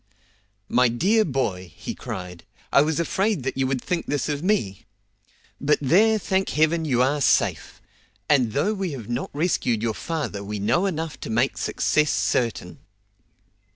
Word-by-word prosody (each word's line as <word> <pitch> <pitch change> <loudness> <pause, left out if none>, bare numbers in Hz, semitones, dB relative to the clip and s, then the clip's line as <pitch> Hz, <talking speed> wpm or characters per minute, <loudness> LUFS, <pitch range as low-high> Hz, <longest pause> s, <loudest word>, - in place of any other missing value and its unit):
"My 125 +1 +4
dear 195 - +2
boy," 100 - -2
he - - -6
cried, 90 -2 -7 0.3
"I 140 - +7
was 155 +2 0
afraid 190 - 0
that 135 - -2
you 135 -1 0
would 130 -1 -1
think 180 -2 -2
this 145 -3 -1
of 145 -1 -2
me. 140 - -1 0.7
But 150 +1 +2
there, 205 +11 +4
thank 190 0 0
Heaven 160 +2 +2
you 125 -4 +2
are 145 +3 +1
safe! - - +1 0.5
and 125 -7 +3
though 195 +10 +1
we 190 -6 -3
have 120 -5 -8
not 120 +2 -2
rescued 140 -8 0
your 115 -1 0
father 150 - -4
we 105 +1 -5
know 170 - +1
enough 160 -4 -4
to - - -7
make 120 +4 +1
success 150 -1 +1
certain." 115 -7 -1
145 Hz, 160 wpm, -24 LUFS, 120-170 Hz, 0.7 s, I